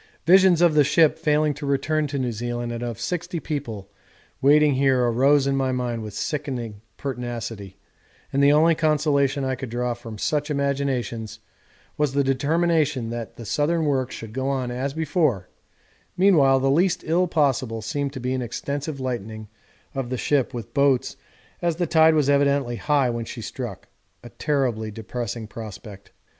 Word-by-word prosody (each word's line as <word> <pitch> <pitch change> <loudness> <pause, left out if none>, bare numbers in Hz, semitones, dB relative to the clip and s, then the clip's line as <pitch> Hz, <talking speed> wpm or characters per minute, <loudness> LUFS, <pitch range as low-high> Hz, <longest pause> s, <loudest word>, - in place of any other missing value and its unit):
Visions 180 0 +6
of 170 -2 +5
the 150 -1 +5
ship 150 +2 +3
failing 150 0 +2
to 145 +2 -10
return 150 +2 0
to 140 0 -4
New 125 -2 -1
Zealand 120 +1 -4
and 120 0 -5
of 120 -3 -4
sixty 175 -1 -3
people 135 -11 -5 0.5
waiting 150 +1 +5
here 130 -1 +2
arose 135 +4 +3
in 140 0 +1
my 135 -1 0
mind 125 -2 -2
with 105 -2 -7
sickening 125 -8 -4 0.2
pertinacity, 115 -7 -5 0.6
and 140 - +2
the 140 - +6
only 160 +3 +5
consolation 145 -3 +1
I 130 - 0
could 130 -1 -6
draw 120 +1 -1
from 115 -2 -9
such 150 +7 -1
imaginations 135 -6 -2 0.6
was 150 -3 +1
the 140 0 +2
determination 145 -2 +1
that 120 -1 -6
the 115 - -9
southern 155 +8 0
work 135 -3 0
should 110 -1 -8
go 130 +1 -2
on 130 -3 -2
as 135 +3 -3
before 155 - 0 0.7
meanwhile 150 -9 +5
the 135 +1 +2
least 175 +4 +2
ill 175 +3 +2
possible 130 -8 0
seemed 140 +5 -2
to 130 - -6
be 125 +1 -2
an 130 - -1
extensive 140 +4 -4
lightening 110 -4 -5 0.4
of 135 -3 -3
the 130 - -2
ship 140 0 +1
with 115 -1 -7
boats 140 -2 +2 0.5
as 170 -2 0
the 175 +1 0
tide 160 0 +5
was 150 -3 +2
evidently 140 -3 +2
high 140 -3 +1
when 115 -1 -4
she - - -8
struck - - -6 0.4
a 120 - -10
terribly 125 -7 -1
depressing 115 +2 -5
prospect. 105 -2 -10
135 Hz, 170 wpm, -23 LUFS, 120-150 Hz, 0.7 s, Visions